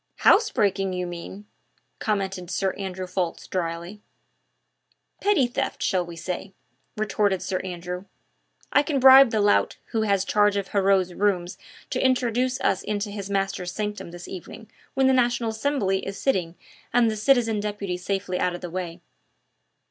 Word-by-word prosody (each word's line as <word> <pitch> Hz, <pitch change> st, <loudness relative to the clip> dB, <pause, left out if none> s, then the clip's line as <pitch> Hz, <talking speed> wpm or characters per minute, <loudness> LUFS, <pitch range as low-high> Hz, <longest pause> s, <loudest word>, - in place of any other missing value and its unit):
"House 435 Hz, +2 st, +6 dB
breaking, 195 Hz, -2 st, 0 dB
you 180 Hz, 0 st, -2 dB
mean!" 175 Hz, +4 st, -8 dB, 0.5 s
commented 190 Hz, -4 st, -2 dB
Sir 190 Hz, +1 st, 0 dB
Andrew 190 Hz, -1 st, -5 dB
Ffoulkes 180 Hz, -2 st, -3 dB
dryly. 170 Hz, +3 st, -4 dB, 1.2 s
"Petty 395 Hz, -10 st, +3 dB
theft, 240 Hz, -, -3 dB
shall 185 Hz, -3 st, +1 dB
we 170 Hz, -1 st, -9 dB
say?" 185 Hz, +3 st, -5 dB, 0.4 s
retorted 205 Hz, -3 st, 0 dB
Sir 185 Hz, -2 st, -2 dB
Percy. 180 Hz, 0 st, -6 dB, 0.7 s
"I 285 Hz, -, +6 dB
can 290 Hz, -2 st, -1 dB
bribe 265 Hz, 0 st, +9 dB
the 220 Hz, -, 0 dB
lout 205 Hz, 0 st, +2 dB
who 225 Hz, -2 st, 0 dB
has 200 Hz, -3 st, +1 dB
charge 205 Hz, -1 st, +3 dB
of 200 Hz, -1 st, -3 dB
Heriot's 195 Hz, -2 st, +2 dB
rooms 185 Hz, -2 st, 0 dB, 0.3 s
to 255 Hz, -, 0 dB
introduce 255 Hz, 0 st, +1 dB
us 190 Hz, -1 st, +1 dB
into 205 Hz, 0 st, -3 dB
his 200 Hz, -1 st, -6 dB
master's 195 Hz, -2 st, -2 dB
sanctum 210 Hz, -3 st, -4 dB
this 175 Hz, +1 st, -9 dB
evening 215 Hz, +4 st, -9 dB, 0.2 s
when 265 Hz, 0 st, +3 dB
the 265 Hz, -, +5 dB
National 240 Hz, -2 st, +2 dB
Assembly 220 Hz, -5 st, 0 dB
is 195 Hz, 0 st, -5 dB
sitting 180 Hz, -10 st, 0 dB, 0.4 s
and 235 Hz, -2 st, +4 dB
the -, -, -3 dB
citizen 225 Hz, -1 st, +2 dB
deputy 205 Hz, -3 st, -3 dB
safely 185 Hz, 0 st, -2 dB
out 180 Hz, -1 st, 0 dB
of -, -, -8 dB
the 175 Hz, -2 st, -6 dB
way." 175 Hz, -1 st, -5 dB
200 Hz, 155 wpm, -25 LUFS, 180-220 Hz, 1.2 s, bribe